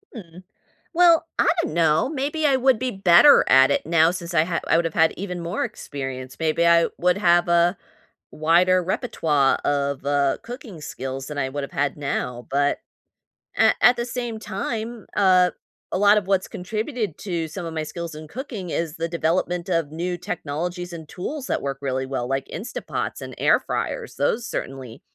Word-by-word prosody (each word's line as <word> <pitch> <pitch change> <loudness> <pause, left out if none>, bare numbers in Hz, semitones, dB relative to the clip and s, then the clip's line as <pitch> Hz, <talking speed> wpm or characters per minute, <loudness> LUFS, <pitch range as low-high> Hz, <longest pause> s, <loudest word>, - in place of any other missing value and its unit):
Mm. 180 -4 -11 0.5
Well, 335 -2 +5
I - - +3
don't 320 - -4
know, 160 +5 +3
maybe 300 +2 -2
I 275 - +4
would 260 -3 +3
be 255 +1 -1
better 195 +7 +6
at 130 0 +6
it - - 0
now 165 0 +4
since 180 -1 -6
I 155 -2 +4
ha 170 0 -2
I - - +3
would've 165 -1 +1
had 160 -1 +4
even 180 -2 -5
more 170 +1 -2
experience, 130 -2 -6
maybe 160 +1 +1
I 170 0 +5
would 180 +2 +2
have 175 -2 +4
a 170 +2 +3 0.5
wider 175 +4 +3
repertoire 155 - +1
of, 140 -1 -1
uh, 140 -1 +1
cooking 235 - -9
skills 135 -1 -6
than 150 -1 -6
I 135 -2 0
would've 140 +1 -5
had 145 -1 -1
now. 125 -4 -3
But 145 +1 +1 0.8
a - - +5
at 245 - +6
the 235 - -2
same 240 -2 -4
time, 225 +3 -5
uh, 185 -2 +4 0.4
a - - 0
lot 205 +2 +5
of 200 -3 -1
what's 195 -1 +1
contributed 215 - -4
to 170 -5 -3
some 175 +3 -7
of 165 - -5
my 160 -1 -2
skills 170 0 -6
in 155 0 -9
cooking 215 - -7
is 165 -1 -2
the 165 +1 -2
development 170 +2 -1
of 165 -4 0
new 175 +3 -3
technologies 175 0 -4
and 160 -2 -8
tools 265 - -6
that - - -1
work 140 -1 -3
really 130 -1 -2
well, 130 -2 -3
like 135 +1 -2
Instapots 215 +9 -5
and - - -8
air - - +4
fryers, - - -4
those 230 +1 0
certainly 130 -4 -6
170 Hz, 180 wpm, -23 LUFS, 150-200 Hz, 0.8 s, better